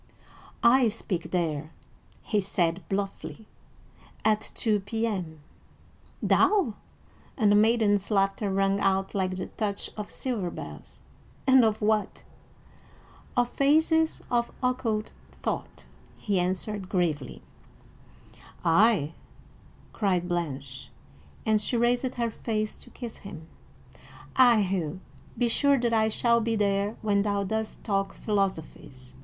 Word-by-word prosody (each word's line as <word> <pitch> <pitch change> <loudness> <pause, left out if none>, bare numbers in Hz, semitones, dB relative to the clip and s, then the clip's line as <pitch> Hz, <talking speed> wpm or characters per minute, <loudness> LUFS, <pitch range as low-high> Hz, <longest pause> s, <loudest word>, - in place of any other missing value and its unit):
"I 245 +1 +6
speak 205 -4 -3
there," 155 -4 -1 0.5
he 210 -2 +1
said 175 -2 0
bluffly, 200 +2 -4 0.8
"at 215 0 +3
two 215 -3 +1
P.M." 195 -6 -3 0.8
"Thou!" 385 - +3 0.6
and 215 -5 +4
the - - +5
maiden's 210 -2 +3
laughter 195 0 +1
rang 195 +1 +2
out 195 0 +1
like 185 -2 -1
the 185 - -3
touch 205 -2 -3
of 210 -1 -6
silver 225 -9 -3
bells, - - -9 0.4
"and 260 -2 +6
of 220 -1 +2
what?" 215 -1 0 1.1
"Of 245 -1 +3
phases 320 +4 +2
of 235 -1 +1
occult 240 -4 0 0.3
thought," - - -4 0.3
he 200 -4 0
answered 185 +2 -2
gravely. 165 -8 -1 1.2
"Ay," 170 -2 +4 0.8
cried 185 -4 0
Blanche, 155 -6 -4 0.6
and 215 -1 +3
she 240 - -1
raised 245 +2 +1
her 235 -1 -1
face 215 -1 -3
to - - -11
kiss 235 -3 -8
him. 165 -5 -10 0.9
"Ay, 240 -5 +6
Hugh, 180 -3 -2 0.4
be 245 - +2
sure 280 +3 +3
that 235 -1 0
I 220 -1 +3
shall 235 +1 +3
be 225 0 0
there 200 0 +1
when 205 -2 +2
thou 200 -1 0
dost 220 +2 -3
talk 195 -2 -1
philosophies." 160 - -3
210 Hz, 120 wpm, -27 LUFS, 190-230 Hz, 1.2 s, I